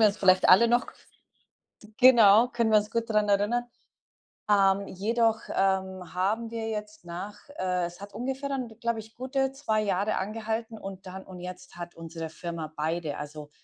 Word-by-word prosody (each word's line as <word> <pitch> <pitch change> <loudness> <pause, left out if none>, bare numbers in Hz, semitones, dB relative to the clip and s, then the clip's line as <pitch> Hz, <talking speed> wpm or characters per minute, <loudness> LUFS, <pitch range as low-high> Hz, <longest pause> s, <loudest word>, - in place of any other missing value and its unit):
wir 220 - +7
uns 200 - -4
vielleicht 185 -1 +5
alle 200 +6 +7
noch 240 +2 +2 1.1
genau, 235 -3 +7
können 235 -2 0
wir 215 - +7
uns 210 +1 -7
gut 230 0 -1
dran 210 -1 +2
erinnern. 205 +5 +2 0.8
Ähm, 200 -1 +4
jedoch, 225 +3 +1
ähm, 190 -2 -1
haben 215 +5 -1
wir 225 -1 -3
jetzt 210 -3 -6
nach, 180 +4 -6 0.2
äh 180 -1 0
es 175 +2 -9
hat 200 0 -9
ungefähr 265 +5 -3
dann, 265 -3 -2
glaube 235 -1 -1
ich, 220 +1 -12
gute 265 +1 -1
2 220 -7 0
Jahre 200 +1 0
angehalten 220 +2 -3
und 195 -2 -8
dann 190 +1 -8
und 185 -1 -10
jetzt 180 0 -9
hat 175 0 -8
unsere 165 -1 -7
Firma 165 -1 -6
beide 155 0 -2
also, 150 0 -8
205 Hz, 170 wpm, -28 LUFS, 185-230 Hz, 1.1 s, wir